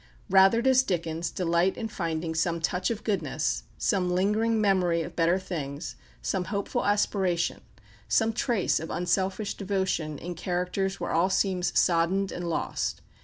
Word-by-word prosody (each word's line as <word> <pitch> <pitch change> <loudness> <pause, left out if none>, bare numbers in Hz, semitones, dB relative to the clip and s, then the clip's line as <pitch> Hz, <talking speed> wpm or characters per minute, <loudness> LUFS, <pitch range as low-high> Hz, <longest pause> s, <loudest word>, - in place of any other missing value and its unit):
Rather 195 +4 +6
does 260 -1 +5
Dickens 170 -6 -2
delight 175 +1 +1
in 225 - -3
finding 165 -5 -3
some 170 +1 0
touch 180 +2 0
of 230 -2 -3
goodness, 165 -8 -1
some 185 -3 +1
lingering 210 +5 +1
memory 180 -5 +2
of - - -8
better 170 +2 +3
things, 160 -5 -5 0.3
some 185 -2 -1
hopeful 200 +1 -2
aspiration, 195 -4 +1 0.5
some 225 0 +2
trace 230 -3 +1
of 160 - -6
unselfish 190 +3 -1
devotion 190 -6 -2
in 175 +5 -6
characters 180 +2 -2
where - - -3
all 170 +3 +3
seems 190 -2 +1
soddened 180 +3 +2
and 175 -1 -4
lost. 65 - -2
180 Hz, 145 wpm, -27 LUFS, 170-195 Hz, 0.5 s, Rather